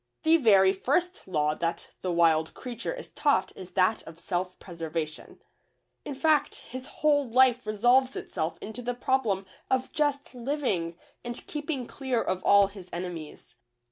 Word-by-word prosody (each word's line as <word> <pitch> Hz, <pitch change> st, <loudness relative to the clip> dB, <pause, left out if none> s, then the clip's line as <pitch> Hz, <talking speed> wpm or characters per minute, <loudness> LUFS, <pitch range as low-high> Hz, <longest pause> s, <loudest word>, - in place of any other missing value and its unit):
The 320 Hz, +1 st, +6 dB
very 195 Hz, -8 st, +5 dB
first 340 Hz, -, -1 dB
law 150 Hz, -4 st, +1 dB
that 165 Hz, +2 st, -3 dB
the 185 Hz, -, -1 dB
wild 160 Hz, -2 st, +3 dB
creature 240 Hz, -2 st, -5 dB
is -, -, -7 dB
taught 295 Hz, -1 st, +2 dB
is 185 Hz, -1 st, -10 dB
that 190 Hz, +3 st, +3 dB
of 160 Hz, 0 st, -10 dB
self 180 Hz, +1 st, -3 dB
preservation; 165 Hz, -3 st, -6 dB, 0.6 s
in 285 Hz, -, -5 dB
fact, 305 Hz, +1 st, +2 dB
his 255 Hz, +1 st, -7 dB
whole 290 Hz, -4 st, +1 dB
life 250 Hz, -1 st, +4 dB
resolves 245 Hz, +5 st, +3 dB
itself 160 Hz, +1 st, -3 dB
into 220 Hz, +3 st, -6 dB
the 245 Hz, 0 st, -3 dB
problem 240 Hz, -7 st, 0 dB, 0.2 s
of 260 Hz, 0 st, 0 dB
just 290 Hz, -3 st, -1 dB
living 235 Hz, -, -2 dB, 0.3 s
and 240 Hz, 0 st, -6 dB
keeping 295 Hz, -4 st, -3 dB
clear 260 Hz, -1 st, -2 dB
of 185 Hz, -4 st, -1 dB
all 200 Hz, 0 st, +6 dB
his 195 Hz, -2 st, -10 dB
enemies. 175 Hz, -3 st, -7 dB
225 Hz, 150 wpm, -28 LUFS, 180-265 Hz, 0.6 s, The